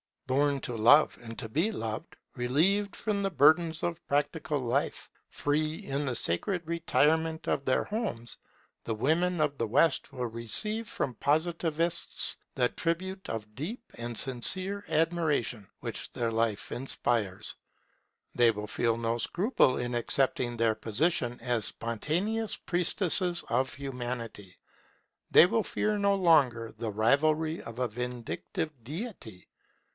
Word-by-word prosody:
Born 140 +1 +1
to 120 - -4
love 135 +8 +5
and 115 -1 -9
to 110 - -6
be 170 - +1
loved, 115 - -5 0.2
relieved 165 +12 +2
from 210 -2 -1
the 195 - 0
burdens 160 0 +4
of 170 0 -2
practical 145 +1 0
life, 120 -2 -2 0.2
free 155 +2 -1
in 140 +2 -2
the 130 -2 -2
sacred 165 - +1
retirement 160 -1 +1
of 135 - 0
their 130 - +2
homes, 200 - -3 0.5
the 115 - -2
women 160 +8 +1
of 145 -2 0
the 115 - -1
West 145 +7 +2
will 125 -1 -2
receive 165 - -1
from 140 - -2
Positivists 165 +3 0 0.2
the 125 -2 +2
tribute 190 +3 -3
of 105 -1 -5
deep 190 - -5
and 120 -1 -5
sincere 185 - +2
admiration 155 - 0
which - - -4
their 115 -1 -1
life 115 -2 -1
inspires. 115 -6 -1 0.8
They 120 -1 +5
will 105 -1 -6
feel 115 +1 0
no 115 0 -1
scruple 175 - +2
in 120 0 -3
accepting 120 0 +1
their 115 -1 +2
position 120 +2 0
as 120 -3 0
spontaneous 180 - -1
priestesses 180 0 +1
of 130 0 0
Humanity; 120 -7 -6 0.7
they - - +8
will 220 +5 +1
fear 210 +1 -1
no 200 0 +3
longer 140 - +3
the 115 0 -4
rivalry 155 +9 +2
of 115 0 -9
a 125 -1 0
vindictive 125 +6 -4
Deity. 145 - -7
140 Hz, 135 wpm, -29 LUFS, 115-170 Hz, 0.8 s, they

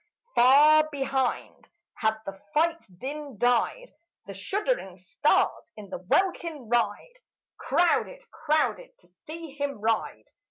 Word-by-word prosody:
Far 300 +5 +6
behind 270 -2 -2 0.2
had 220 -1 0
the 195 - -5 0.2
fight's 330 0 +1
din 270 +7 -8
died; 245 - 0 0.3
The 200 - -8
shuddering 290 - -2
stars 185 - 0
in 205 -3 -11
the - - -5
welkin 320 - -1
wide 240 - -1 0.4
Crowded, 425 +8 +1
crowded, 320 +11 -1
to - - -23 0.2
see 325 0 -8
him 280 -3 -4
ride. 220 +1 -1
285 Hz, 115 wpm, -26 LUFS, 225-335 Hz, 0.4 s, Far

